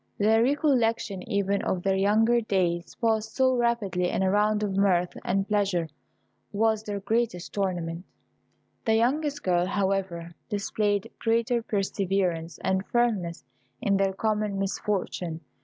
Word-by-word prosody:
The 220 +2 +4
recollection 240 -7 +1
even 200 -2 +1
of 180 -1 -2
their 195 -1 +2
younger 220 +5 +3
days 175 -5 -1
passed 220 -2 0
so 260 -1 +3
rapidly 220 -7 0
in - - 0
a 190 - +2
round 210 +1 +2
of 200 -2 -1
mirth 180 -3 +2
and 195 +1 0
pleasure 195 -6 0 0.6
was 220 +1 +1
their 205 -2 -4
greatest 210 -3 -1
torment. 175 -4 -2 0.8
The 220 - +3
youngest 285 +5 +1
girl, 180 -1 +2
however, 190 -4 -1 0.2
displayed 205 0 -1
greater 230 +1 +1
perseverance 190 -5 -1
and 190 0 +1
firmness 215 -9 0 0.3
in 200 -1 +1
their 195 -1 +1
common 210 0 -1
misfortune. 190 -4 -2
200 Hz, 130 wpm, -27 LUFS, 190-225 Hz, 0.8 s, The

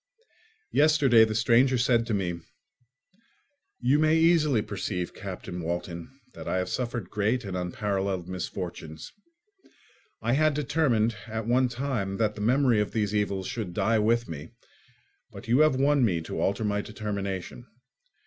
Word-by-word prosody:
Yesterday 145 -6 +5
the 110 0 -3
stranger 120 +3 +4
said 120 -1 +2
to 115 - -1
me, 90 -3 -2 1.4
"You 130 +4 +3
may 155 +1 +4
easily 155 -8 +3
perceive, 95 -3 -4
Captain 90 - -7
Walton, 85 0 -4 0.2
that - - -9
I - - 0
have 90 - -1
suffered 120 -2 -3
great 110 +4 0
and 95 -2 -4
unparalleled 95 0 -2
misfortunes. 85 -4 -6 1.1
I 115 +2 0
had 155 +1 +3
determined 135 -7 +1
at 110 0 -4
one 125 +2 +2
time 120 -6 -3
that 110 -2 +1
the 105 - -8
memory 125 0 +3
of 105 - -3
these 105 -2 0
evils 100 -2 -1
should 95 -6 -5
die 110 +3 +2
with 115 +2 +2
me, 75 -3 -8 0.8
but - - -11
you 120 +4 +3
have 155 -3 +5
won 140 +1 +3
me 90 -8 +2
to 80 - -5
alter 100 +5 0
my 105 -1 0
determination. 100 +1 -5
110 Hz, 150 wpm, -27 LUFS, 95-125 Hz, 1.4 s, Yesterday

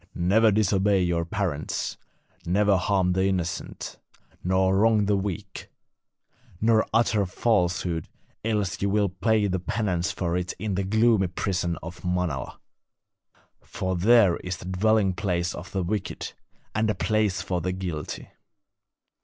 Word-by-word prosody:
Never 105 +6 +4
disobey 100 -2 +2
your 85 -1 0
parents; 85 -4 -2 0.5
never 100 +3 +3
harm 95 0 +1
the 95 +1 +1
innocent, 90 -3 -3 0.4
nor 95 +1 +2
wrong 105 +1 +4
the 100 0 +2
weak, 100 +1 -4 0.9
nor 110 +1 +3
utter 115 -3 +3
falsehood, 90 -5 0 0.4
else 105 -4 -1
ye 100 - +2
will 100 0 +2
pay 105 +3 +1
the 95 -2 0
penance 95 0 -1
for 85 -2 -2
it 90 0 -2
in 105 -2 -3
the 95 +1 0
gloomy 110 0 +3
prison 90 -1 -2
of 85 +1 -9
Manala; 90 -7 -2 1.0
for 95 0 -3
there 100 -1 +5
is 90 -1 -5
the - - -11
dwelling 95 +1 +2
place 90 -3 -1
of 90 +3 -8
the 95 -2 -1
wicked, 100 +2 -3 0.4
and 110 +1 +1
a 105 - +1
place 110 -3 0
for 90 -2 -2
the 90 +2 -1
guilty. 90 -5 -5
95 Hz, 135 wpm, -26 LUFS, 90-105 Hz, 1.0 s, there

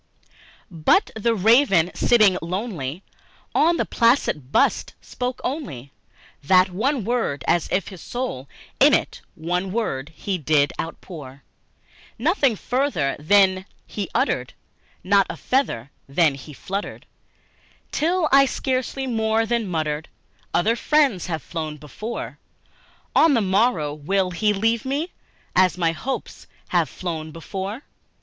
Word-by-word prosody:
But 165 - +2
the 230 +1 +1
Raven, 200 - +4
sitting 215 -6 +4
lonely 175 - -4 0.5
on 335 +2 +3
that - - -2
placid 230 - +2
bust, - - +1
spoke 250 0 -4
only 145 - -5 0.5
That 185 +4 +4
one 240 +4 -1
word, 225 - -1
as 170 -2 +2
if 185 - 0
his 190 -4 -11
soul 240 - -5 0.3
in - - +6
that - - 0
one 180 +3 -2
word 155 - -2
he 195 -3 -3
did 145 -1 +2
outpour; 150 -5 -8 0.7
Nothing 275 - +2
further 250 - -1
then 190 +3 +3 0.2
he 200 -4 -5
uttered, 125 0 0 0.5
not 195 +1 +3
a - - -5
feather 140 - -1 0.2
then 155 +1 +3
he 135 +3 -10
fluttered, 195 +8 -5 0.9
Till 335 +2 +1
I 275 0 +6
scarcely 260 0 -2
more 225 -2 +1
than 230 -2 -1
muttered 155 -2 -2 0.4
"Other 215 +7 +2
friends 270 - +2
have 160 -5 -3
flown 155 -3 -5
before, 210 +11 -7 0.8
On 320 -4 +5
the - - +3
morrow 190 -7 +1 0.3
he 210 +4 +1
will 200 - -2
leave 225 +1 +1
me, 285 +6 -2 0.4
as 185 -1 +4
my 165 -2 +2
hopes 255 +12 -5 0.2
have - - +2
flown 160 -3 -5
before." 195 - -6
195 Hz, 130 wpm, -23 LUFS, 160-240 Hz, 0.9 s, in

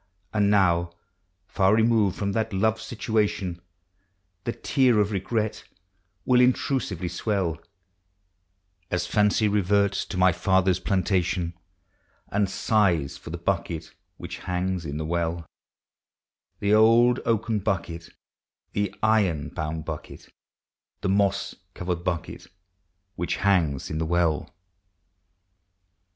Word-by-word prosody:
And 105 -2 +2
now, 85 -4 +3 0.5
far 95 +2 +2
removed 110 -4 +3
from 100 -1 -1
the 110 +2 0
loved 110 +3 +1
situation, 105 -6 -1 0.8
The 120 - 0
tear 130 -2 +2
of 105 0 +1
regret 105 +2 -2 0.6
will 125 -1 +5
intrusively 125 - +1
swell, 90 -2 -2 1.3
As 85 0 -1
fancy 105 +3 +2
reverts 100 0 +2
to - - -6
my 90 0 +5
father's 95 +1 +2
plantation, 90 -3 0 0.8
And 100 -1 +1
sighs 95 -9 +1
for - - -11
the 85 - -4
bucket 85 -2 -3 0.2
which - - -7
hangs 90 0 -2
in 70 +1 -4
the 80 - -3
well; 85 0 -2 1.2
The 100 +1 +2
old 115 +3 +5
oaken 110 -1 0
bucket, 85 -4 -3 0.6
the 100 0 -2
iron 100 -9 +2
bound 80 0 -4
bucket, - - -8 0.7
The - - -1
moss 100 0 +1 0.2
covered 90 -1 -3
bucket 85 0 -4 0.7
which 85 - -2
hangs 85 -9 +1
in 80 - -2
the 80 - -1
well. 85 -3 0
95 Hz, 110 wpm, -25 LUFS, 85-105 Hz, 1.3 s, will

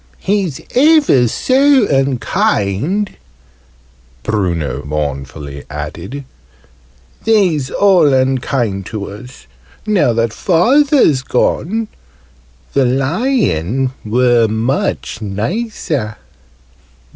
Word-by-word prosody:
"He's 195 -7 -1
ever 285 - +4
so 265 - +3
unkind!" 135 - 0 1.1
Bruno 85 - -2
mournfully 70 -1 -5
added. 85 - -6 1.0
"They's 180 - +2
all 180 -6 +4
unkind 130 -6 0
to 105 -3 -5
us, 120 - -12 0.4
now 185 - +2
that 115 -1 0
Father's 245 - +3
gone. 205 - -1 0.9
The 135 -2 +3
Lion 135 - 0
were 120 +1 +3
much 110 - -2
nicer!" 115 - -3
130 Hz, 75 wpm, -15 LUFS, -, 1.1 s, ever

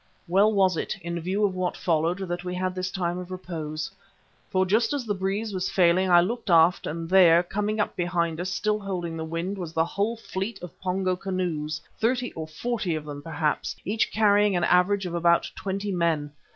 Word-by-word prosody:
Well 195 +5 +4
was 190 -4 +3
it, - - -3
in 170 0 -3
view 190 +5 0
of 195 - 0
what 185 -1 -2
followed, 165 +1 +1
that 175 0 -3
we 180 0 -4
had 185 0 -1
this 185 0 -3
time 175 -1 -2
of 180 0 -8
repose. 160 -4 -5 0.6
For 190 -2 +2
just 220 +6 +2
as 280 -4 -2
the 210 - 0
breeze 200 +3 -2
was 185 -1 -1
failing 185 +1 +3
I 175 -1 +7
looked 225 +4 -3
aft 170 +1 +5
and 165 +1 -4
there, 175 -2 +6
coming 210 +4 -2
up 210 - 0
behind 170 -2 -1
us, 185 - -3
still 210 +3 0
holding 180 -5 -4
the 160 - -4
wind, 170 +5 -3
was 170 -3 -5
the 160 0 +2
whole 205 +6 -1
fleet 195 -1 -4
of 180 - -8
Pongo 185 0 0
canoes, 175 -5 -3 0.2
thirty 245 +2 +1
or 160 -1 -5
forty 195 +2 -2
of 155 -1 -5
them 145 -1 -7
perhaps, 155 -1 -2
each 215 +4 0
carrying 205 -2 +4
an 175 - +1
average 185 +3 +3
of 175 - -4
about 170 0 +2
twenty 200 +1 -3
men. 165 -5 0
185 Hz, 205 wpm, -26 LUFS, 170-200 Hz, 0.6 s, I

